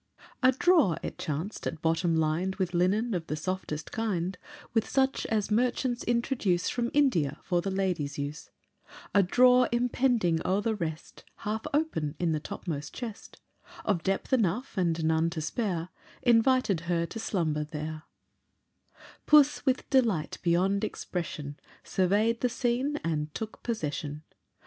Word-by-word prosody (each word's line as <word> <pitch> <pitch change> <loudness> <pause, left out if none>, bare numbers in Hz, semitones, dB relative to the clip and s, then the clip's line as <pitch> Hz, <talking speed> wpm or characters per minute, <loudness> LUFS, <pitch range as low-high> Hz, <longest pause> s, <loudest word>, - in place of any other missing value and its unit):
A 255 0 +6
drawer, 275 - +3
it - - -5
chanced, 160 +8 -3
at 165 - -4
bottom 165 +1 +2
lined 160 +4 0
With 185 -2 -2
linen 200 +7 +2
of 170 -3 -3
the 150 - -2
softest 160 -2 -4
kind, 195 -5 -1 0.4
With 225 -2 +1
such 270 0 +1
as 215 -2 0
merchants 245 +2 +1
introduce 235 -7 +1
From 240 -1 -1
India, 180 - +2
for 175 -2 +1
the 195 - -2
ladies' 180 -7 -1
use, 145 +2 -5 0.6
A 200 - +6
drawer 250 +6 +5
impending 240 -7 +2
o'er 190 +2 +1
the 225 +2 0
rest, 165 -6 -5 0.2
Half 220 +1 -2
open 280 - 0
in 175 -2 0
the 155 - 0
topmost 150 -1 -6
chest, 230 -4 -8 0.4
Of 195 -5 +1
depth 195 - -1
enough, 230 +2 +1
and 170 -4 0
none 160 +1 +2
to 165 - -4
spare, 175 +1 -2 0.3
Invited 240 -5 +4
her 170 -1 +1
to 225 - -7
slumber 160 -8 -1
there; 155 0 -6 1.2
Puss 295 -1 +5
with 260 -1 +1
delight 225 - +2
beyond 190 +4 +2
expression, 155 -8 -4 0.2
Survey'd 210 +5 +1
the 250 - +2
scene, 250 +4 0
and 155 -2 -1
took 220 -1 -6
possession. 150 - -3
190 Hz, 145 wpm, -29 LUFS, 160-235 Hz, 1.2 s, A